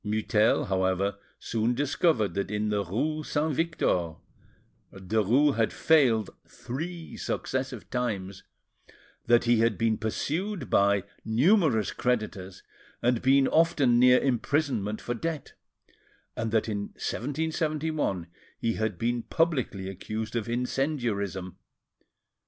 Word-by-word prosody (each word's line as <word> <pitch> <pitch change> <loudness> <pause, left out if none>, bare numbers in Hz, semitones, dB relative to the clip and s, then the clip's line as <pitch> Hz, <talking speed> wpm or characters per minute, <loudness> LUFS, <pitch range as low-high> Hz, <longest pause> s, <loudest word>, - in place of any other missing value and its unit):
Mutel, 110 0 +2
however, 95 +1 0 0.2
soon 115 +2 -1
discovered 140 - +1
that 100 +1 -2
in 105 +1 -1
the 105 -1 0
rue 150 - -2
Saint 155 0 -1
Victor, 110 - 0 0.8
Derues 110 +9 +2
had 115 -1 +2
failed—three 145 - 0
successive 130 -3 -3
times, 100 -7 -3 0.9
that 120 0 +5
he 120 -1 +3
had 115 -1 +2
been 115 -1 +1
pursued 165 - -3
by 100 -1 +3 0.2
numerous 125 - +3
creditors, 105 -6 -2 0.4
and 120 -1 +2
been 135 +1 +4
often 155 -7 +3
near 125 0 +7
imprisonment 125 -5 0
for 120 - -3
debt, 155 +3 -4 0.8
and 115 -1 -2
that 110 0 +1
in 105 -2 -2 0.2
1771 155 - -2 0.3
he 115 -1 -1
had 110 -4 -2
been 120 +3 -1
publicly 130 - -1
accused 110 +4 -5
of 115 -1 -2
incendiarism. 120 - -2
115 Hz, 110 wpm, -27 LUFS, 105-145 Hz, 0.9 s, near